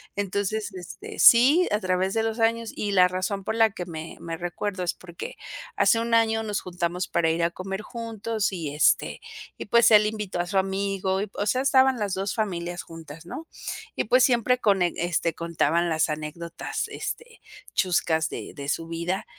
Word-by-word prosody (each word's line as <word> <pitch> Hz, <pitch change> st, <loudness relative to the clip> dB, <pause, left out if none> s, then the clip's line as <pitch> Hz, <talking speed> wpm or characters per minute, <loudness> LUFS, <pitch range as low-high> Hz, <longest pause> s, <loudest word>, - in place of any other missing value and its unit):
Entonces, 205 Hz, +1 st, -2 dB
este, 180 Hz, -2 st, -9 dB
sí, 275 Hz, +10 st, +7 dB
a 210 Hz, -, +2 dB
través 185 Hz, -1 st, 0 dB
de 225 Hz, -, +1 dB
los 225 Hz, +1 st, -2 dB
años 230 Hz, 0 st, +1 dB
y 205 Hz, -, -2 dB
la 180 Hz, -2 st, +6 dB
razón 185 Hz, +2 st, -2 dB
por 220 Hz, -, -2 dB
la 225 Hz, -1 st, +4 dB
que 180 Hz, -2 st, -6 dB
me 160 Hz, -2 st, -8 dB
me 165 Hz, -1 st, -5 dB
recuerdo 180 Hz, +3 st, -3 dB
es 175 Hz, -, 0 dB
porque, 175 Hz, -2 st, -9 dB, 0.4 s
hace 225 Hz, -, +4 dB
1 230 Hz, 0 st, -2 dB
año 225 Hz, -1 st, +3 dB
nos 210 Hz, -2 st, -2 dB
juntamos 175 Hz, 0 st, -3 dB
para 170 Hz, -1 st, +1 dB
ir 165 Hz, +1 st, 0 dB
a 170 Hz, -, +1 dB
comer 195 Hz, +3 st, -5 dB
juntos, 225 Hz, -2 st, -3 dB
y 160 Hz, -6 st, -4 dB
este, 150 Hz, -, +2 dB, 0.4 s
y -, -, -6 dB
pues 235 Hz, +2 st, +5 dB
él 210 Hz, -1 st, +7 dB
invitó 210 Hz, -4 st, -4 dB
a 175 Hz, -, -1 dB
su 195 Hz, -, -1 dB
amigo, 195 Hz, 0 st, 0 dB
y 210 Hz, -, -4 dB
o 205 Hz, -, -2 dB
sea, 255 Hz, +4 st, +2 dB
estaban 265 Hz, -2 st, +4 dB
las 205 Hz, -3 st, -1 dB
dos 195 Hz, +1 st, -2 dB
familias 175 Hz, -5 st, -2 dB
juntas, 165 Hz, -1 st, -11 dB
¿no? 320 Hz, -, -8 dB, 0.5 s
Y -, -, -1 dB
pues 250 Hz, +3 st, +4 dB
siempre 250 Hz, 0 st, +3 dB
con 200 Hz, -5 st, +2 dB
e 175 Hz, -1 st, +2 dB
este, 170 Hz, -1 st, 0 dB
contaban 170 Hz, 0 st, 0 dB
las 160 Hz, 0 st, +1 dB
anécdotas 155 Hz, +2 st, -4 dB
este, 470 Hz, 0 st, -6 dB, 0.3 s
chuscas 160 Hz, -3 st, +1 dB
de -, -, -7 dB
de 140 Hz, -1 st, -5 dB
su 165 Hz, +2 st, -2 dB
vida, 170 Hz, +3 st, -3 dB
190 Hz, 190 wpm, -25 LUFS, 170-220 Hz, 0.5 s, sí